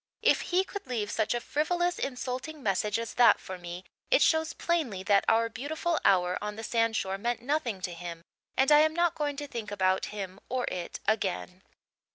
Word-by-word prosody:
If - - +4
he 360 +2 +1
could 405 -5 -8
leave 225 -4 -2
such 220 +1 0
a - - 0
frivolous, 350 +7 0
insulting 265 +3 -4
message 210 +1 +1
as 230 -1 -4
that 245 -1 +6
for 185 -1 -8
me 175 +1 -7 0.3
it - - +5
shows 320 0 +2
plainly 280 - -1
that 200 0 +4
our 230 +1 +4
beautiful 315 +8 -2
hour 180 -2 +3
on 210 0 -4
the 225 - -7
sandshore 225 -4 0
meant 240 +2 -2
nothing 250 -8 -1
to 180 -1 -3
him 170 -1 -7 0.3
and 270 +3 +4
I 295 - +8
am 315 +1 +3
not 345 -1 +2
going 290 -1 -2
to 290 +1 -5
think 230 -6 -5
about 190 -2 +1
him 195 -2 -6
or 255 0 -1
it 175 -2 -5
again. 190 -3 -1
230 Hz, 195 wpm, -29 LUFS, 195-295 Hz, 0.3 s, I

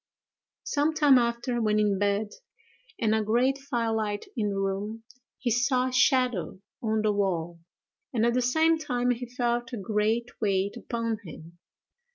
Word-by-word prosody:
Some 300 +2 0
time 290 -4 +6
after, 235 0 -1
when 215 -1 +2
in 205 -2 +2
bed, 205 +1 +1 0.7
and 220 -1 +1
a 220 - +2
great 245 +6 +1
fire 240 -5 -1
light 210 -2 -2
in 210 -3 0
the 200 - -3
room, 195 +3 -3 0.3
he 245 -2 -1
saw 250 +2 +2
a - - -8
shadow 255 - +2 0.2
on 220 -1 0
the 210 -1 +2
wall, 175 -4 -1 0.5
and 230 -3 +1
at 235 - +2
the 250 - +2
same 320 +6 +3
time 250 -5 0
he 245 0 -4
felt 240 -1 -1
a - - -2
great 215 +4 -1
weight 200 -1 0
upon 230 -2 -3
him. 165 0 -12
230 Hz, 165 wpm, -27 LUFS, 205-250 Hz, 0.7 s, time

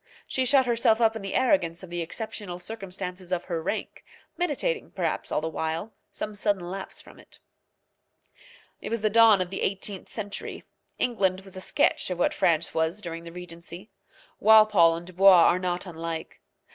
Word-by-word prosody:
She 260 - -1
shut 265 0 +5
herself 230 -2 +3
up 225 -1 +3
in 220 - -5
the 195 -1 -5
arrogance 180 -9 +1
of 180 - -10
the 175 0 -2
exceptional 190 +1 -5
circumstances 185 -2 -7
of 180 -1 0
her 170 -3 -3
rank, 195 +6 -4 0.3
meditating, 355 - -1
perhaps, - - -2
all - - 0
the 160 - -2
while, 160 +6 -3 0.2
some 215 - -6
sudden 200 -4 -1
lapse 195 0 -6
from - - -14
it. - - -15 1.4
It - - -6
was 230 -1 -2
the 215 -1 +1
dawn 225 -3 +6
of 180 0 -3
the 195 - -4
eighteenth 195 0 -3
century. 205 -2 -6 0.3
England 190 -6 +1
was 195 -1 -14
a 185 - -6
sketch - - +1
of 180 - -3
what 175 - +1
France 165 -1 +1
was 160 +5 0
during 165 -3 -7
the 170 - -8
regency. 175 +2 -10 0.5
Walpole 215 -6 +6
and 170 +1 -7
Dubois 185 -1 +6
are 180 - +4
not 180 0 -2
unlike. 165 -2 -6
185 Hz, 175 wpm, -26 LUFS, 170-215 Hz, 1.4 s, dawn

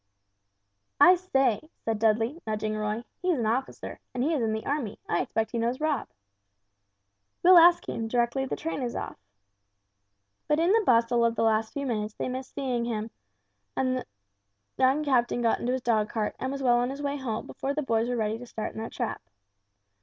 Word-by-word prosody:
"I 360 - +9
say," 275 - 0 0.2
said 225 -2 -1
Dudley, 225 +8 +1
nudging 215 0 -2
Roy; 215 +2 -2 0.2
"he's 360 -4 +1
an 235 - -1
officer, 245 +5 -2 0.2
and 250 - 0
he 315 +4 +1
is 290 - 0
in 225 -1 +1
the 220 0 -3
army, 275 -8 -2
I 175 - +1
expect 225 0 -2
he 235 - -2
knows 235 +3 -1
Rob." 305 -4 0 1.4
"We'll 360 0 +9
ask 345 +1 +6
him, 225 - -3
directly 240 +3 0
the - - -2
train 320 -3 -4
is 245 -2 -3
off." - - -5 1.3
But 300 - +2
in 340 +3 +3
the 450 +2 +5
bustle 235 0 +4
of 230 0 +2
the - - 0
last 220 0 +1
few 280 0 -3
minutes 215 -4 -2
they - - -3
missed 255 +1 -6
seeing 250 -4 -1
him; 220 -1 -3 0.6
the 255 -1 0 0.8
young 265 +4 +3
captain 245 -4 +1
got 230 - +2
into 245 +1 -1
his 260 -1 -2
dog 215 -3 +1
cart, 215 -2 -2
and 260 - -2
was 275 0 -4
well 240 -2 +4
on 245 +1 +1
his 275 +2 -6
way 285 0 -1
home 235 -5 -4
before 275 +1 -4
the 300 - -1
boys 230 -2 +1
were 245 - 0
ready 220 -1 -1
to 245 - -10
start 220 - -4
in - - -7
their 225 - -4
trap. - - -4
245 Hz, 200 wpm, -27 LUFS, 225-275 Hz, 1.4 s, I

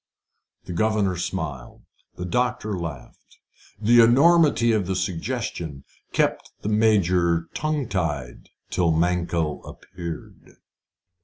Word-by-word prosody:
The - - -7
governor 105 0 +1
smiled. 65 -7 -5 0.3
The 90 - -5
doctor 120 0 -1
laughed. 80 -8 -8 0.4
The 115 +3 +5
enormity 140 0 +5
of 105 -5 0
the 95 - -1
suggestion 90 - -3 0.3
kept - - 0
the 105 - -1
Major 90 -6 +2
tongue 155 -4 -1
tied 75 - -3 0.2
till 85 -2 +2
Mankell 85 -2 0
appeared. 85 -3 -9
90 Hz, 100 wpm, -24 LUFS, 85-110 Hz, 0.4 s, The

